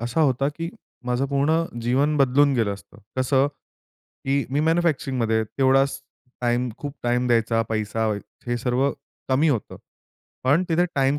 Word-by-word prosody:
असा 120 +7 -1
होता, 135 -2 +2
की 165 +3 -5 0.4
माझं 125 +2 0
पूर्ण 145 +4 +1 0.2
जीवन 135 +6 +1
बदलून 140 +1 +4
गेलं 110 -5 +1
असतं. 100 - -16 0.2
कसं? 130 +1 +3 0.8
की 140 0 +1
मी 145 +2 +1
मॅन्युफॅक्चरिंगमध्ये. 135 -9 +1
तेवढाच 135 +3 +2 0.4
टाईम, 120 +1 +1
खूप 145 -1 -6
टाईम 120 +1 +1
द्यायचा, 115 -1 +2
पैसा 110 0 -1 0.4
हे 120 0 0
सर्व 125 +3 +1 0.4
कमी 140 +5 +3
होतं. 125 -8 -1 0.7
पण 145 +7 +4
तिथे 170 +1 +3
टाईम 135 +1 +2
135 Hz, 140 wpm, -24 LUFS, 120-145 Hz, 0.8 s, बदलून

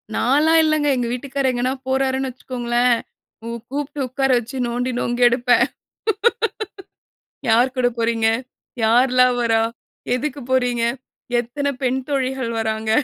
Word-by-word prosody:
நான்லா 295 +6 +3
இல்லங்க. 310 -1 +2
எங்க 240 -1 -1
வீட்டுக்காரரு 270 +1 -1
எங்கனா 250 +2 0
போறார்னு 265 0 0
வச்சுக்கோங்களே? 245 -1 -2 0.6
கூ, 230 - -7 0.2
கூப்ட்டு 290 +1 -4
உக்கார 270 +1 0
வச்சு 240 +3 -8
நோண்டி 245 +2 -1
நொங்கெடுப்பேன். 245 +1 +3 1.8
யார் 245 +4 +3
கூட 245 -1 +3
போகிறீங்க? 225 -1 +1 0.6
யார்ல்லாம் 250 +2 +4
வர்றா? 225 -1 +2 0.5
எதுக்கு 285 +2 -3
போறீங்க? 245 -2 +2 0.6
எத்தன 280 +4 -2
பெண் 260 +1 +1
தோழிகள் 265 -3 -1
வராங்க? 220 0 -1
250 Hz, 110 wpm, -21 LUFS, 240-270 Hz, 1.8 s, யார்ல்லாம்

